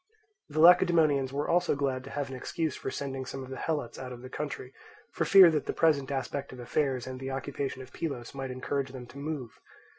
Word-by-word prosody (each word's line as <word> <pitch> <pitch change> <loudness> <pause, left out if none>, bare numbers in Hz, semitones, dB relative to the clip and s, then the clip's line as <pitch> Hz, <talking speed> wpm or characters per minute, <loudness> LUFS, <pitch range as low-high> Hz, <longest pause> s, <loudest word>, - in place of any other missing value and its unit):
The 155 +1 -3
Lacedaemonians 155 -5 +6
were 145 +2 -2
also 175 -3 +2
glad 135 -2 -1
to - - -8
have 145 0 -3
an - - -5
excuse 155 +3 -2
for - - -4
sending 135 -1 -4
some 135 +1 -6
of 130 - -10
the 130 - -5
Helots 145 -7 -2
out 130 -1 -6
of 125 0 -9
the 130 - -9
country, 140 -3 -5 0.4
for - - 0
fear 190 -3 +9
that 150 -3 -1
the - - -1
present 145 -5 +3
aspect 140 0 -3
of 130 - -10
affairs 130 0 0
and 130 0 -6
the 135 0 -5
occupation 135 0 -4
of 130 - -15
Pylos 135 -8 -4
might 135 -1 -5
encourage 130 +1 -3
them 125 -2 -7
to 135 +3 -12
move. 140 -6 -5
135 Hz, 220 wpm, -29 LUFS, 130-150 Hz, 0.4 s, fear